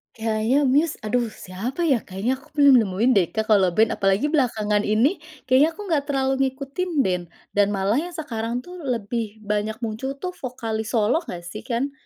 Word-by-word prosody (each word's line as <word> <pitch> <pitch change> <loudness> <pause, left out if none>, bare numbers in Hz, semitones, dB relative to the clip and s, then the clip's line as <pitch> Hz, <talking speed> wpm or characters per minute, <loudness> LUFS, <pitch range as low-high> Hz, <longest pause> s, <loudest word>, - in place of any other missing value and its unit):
Kayaknya 225 +5 +1
Muse, 290 +5 +2
aduh 235 +2 0
siapa 220 - -5
ya 245 - +4
kayaknya 220 +8 -2
aku - - -20
belum 280 -4 +7
nemuin 215 +4 +1
deh 195 -7 +4
Kak, 220 0 0
kalau 195 -3 +5
band 220 +1 +4
apalagi 195 +10 +2
belakangan 215 -8 +1
ini 235 - +2 0.2
kayaknya 280 +6 +3
aku 420 - -8
nggak 290 -3 +2
terlalu 270 -1 +1 0.2
ngikutin 275 +7 -4
band 180 -2 -1 0.2
dan 205 0 +3
malah 200 +7 +1
yang 345 +1 -5
sekarang 240 -5 -3
tuh 360 0 -10
lebih 230 -5 -3
banyak 210 +1 -1
muncul 230 +5 -3
tuh 365 +6 -5
vokalis 230 -7 -4
solo 225 +8 +3
gak 175 - -8
sih 175 +5 -7
kan, 255 +4 -1
235 Hz, 180 wpm, -23 LUFS, 210-275 Hz, 0.2 s, belum